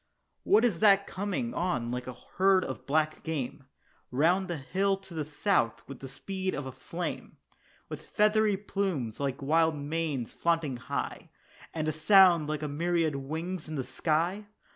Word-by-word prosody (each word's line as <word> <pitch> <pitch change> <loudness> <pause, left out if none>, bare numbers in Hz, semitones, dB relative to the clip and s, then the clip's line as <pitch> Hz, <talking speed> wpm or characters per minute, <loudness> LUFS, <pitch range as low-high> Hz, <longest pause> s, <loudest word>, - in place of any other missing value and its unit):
What 220 +3 +4
is 200 -9 +1
that 200 -2 +5
coming 205 +5 -3
on 130 -10 -1
like 125 0 -4
a 125 - -6 0.2
herd 190 0 +4
of 130 -4 -7
black 155 +2 +1
game, 140 -3 -4 0.4
Round 175 +8 +2
the 175 -3 -3
hill 195 +8 0
to 195 -2 -12
the 155 -2 -2
south, 150 - 0
with 135 -2 -9
the 135 - -8
speed 190 +7 -4
of 145 - -4
a 130 - -5
flame, 175 +6 -6 0.5
With - - -7
feathery 210 -1 +3
plumes 190 - -2
like 140 0 -2
wild 160 +2 +3
manes 145 -4 -3
flaunting 165 -6 0
high, 120 - -4 0.4
And 155 -1 -3
a - - +2
sound 170 -1 +5
like 155 0 -2
a - - -1
myriad 165 +1 0
wings 160 +5 -4
in 155 - -4
the 135 - -2
sky? 170 +10 -1
160 Hz, 165 wpm, -29 LUFS, 140-190 Hz, 0.5 s, that